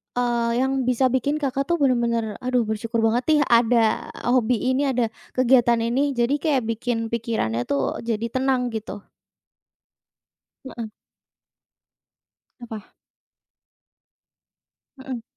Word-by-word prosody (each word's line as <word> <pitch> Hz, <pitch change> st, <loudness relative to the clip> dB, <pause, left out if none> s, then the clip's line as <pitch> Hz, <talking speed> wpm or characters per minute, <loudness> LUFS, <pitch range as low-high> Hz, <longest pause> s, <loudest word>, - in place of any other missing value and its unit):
eee, 240 Hz, -1 st, 0 dB
yang 265 Hz, -1 st, -1 dB
bisa 255 Hz, +1 st, +2 dB
bikin 260 Hz, +3 st, 0 dB
Kakak 275 Hz, -2 st, -2 dB
tuh, 345 Hz, -, +2 dB
benar-benar, 235 Hz, -7 st, 0 dB
aduh 250 Hz, -1 st, +1 dB
bersyukur 225 Hz, +1 st, -2 dB
banget 230 Hz, +3 st, +2 dB
nih 310 Hz, -1 st, +4 dB
ada 230 Hz, -1 st, +3 dB, 0.2 s
hobi 250 Hz, 0 st, +2 dB
ini, 275 Hz, +2 st, +1 dB
ada 245 Hz, -4 st, 0 dB, 0.2 s
kegiatan 240 Hz, -2 st, +4 dB
ini, 270 Hz, +4 st, 0 dB
jadi 240 Hz, +3 st, +1 dB
kayak 285 Hz, -6 st, +1 dB
bikin 230 Hz, 0 st, -3 dB
pikirannya 220 Hz, -, -2 dB
tuh, 140 Hz, -2 st, -1 dB
jadi 230 Hz, 0 st, -3 dB
tenang 260 Hz, -1 st, 0 dB
gitu? 215 Hz, -2 st, -6 dB, 1.6 s
Heeh. 240 Hz, -3 st, -6 dB, 1.7 s
Apa? 225 Hz, -4 st, -8 dB, 2.1 s
Heeh. 265 Hz, -3 st, -6 dB
240 Hz, 110 wpm, -23 LUFS, 230-260 Hz, 2.1 s, nih